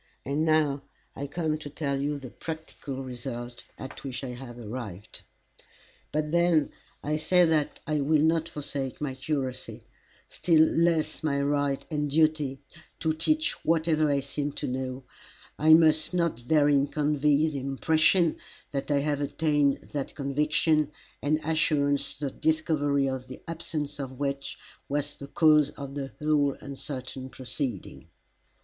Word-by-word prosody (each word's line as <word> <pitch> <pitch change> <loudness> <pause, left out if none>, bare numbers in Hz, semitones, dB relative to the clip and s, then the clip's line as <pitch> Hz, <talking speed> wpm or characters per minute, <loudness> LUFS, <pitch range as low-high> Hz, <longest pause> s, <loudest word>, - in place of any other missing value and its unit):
And 140 +3 0
now 155 -3 +2 0.3
I 140 - -4
come 155 +1 -1
to 150 - -7
tell 140 -2 -2
you 145 +1 -1
the 130 -4 -9
practical 160 -4 -6
result 120 -1 -6
at 135 - -8
which 135 -1 -5
I 130 - -4
have 125 -1 -8
arrived. 110 -4 -7 0.9
"But 150 0 -1
when 170 -3 +3 0.3
I 150 +1 0
say 180 +3 +4
that 155 -3 0
I 150 -1 0
will 150 +1 +3
not 160 +1 +2
forsake 140 -4 -4
my 145 -3 -2
curacy, 130 -1 -4 0.4
still 160 -3 +4
less 165 -2 +1
my 140 -3 0
right 145 -1 0
and 150 -1 0
duty 150 -3 +2 0.4
to 160 -1 +1
teach 310 - 0
whatever 160 -2 +2
I 140 -1 +2
seem 140 +1 -3
to - - -4
know, 130 +1 -3 0.6
I 155 +1 +8
must 160 +1 +4
not 165 -9 0
therein 145 -2 +4
convey 150 +1 +2
the 145 -3 -4
impression 155 +5 +3 0.3
that 140 0 -3
I 140 -1 +3
have 145 0 0
attained 145 -1 +1
that 140 -2 -4
conviction 150 +2 +2 0.3
and 150 +2 +1
assurance 145 -3 +2
the 140 -2 -3
discovery 145 -3 +1
of 130 -1 -3
the 130 - -10
absence 150 -3 -3
of 130 -1 -6
which 140 -1 -2 0.3
was 145 +1 -1
the 140 - -10
cause 150 -2 +5
of 140 -2 -8
the 135 -2 -4
whole 150 -2 +2
uncertain 130 -1 -6
proceeding. 120 - -5
145 Hz, 145 wpm, -28 LUFS, 135-155 Hz, 0.9 s, I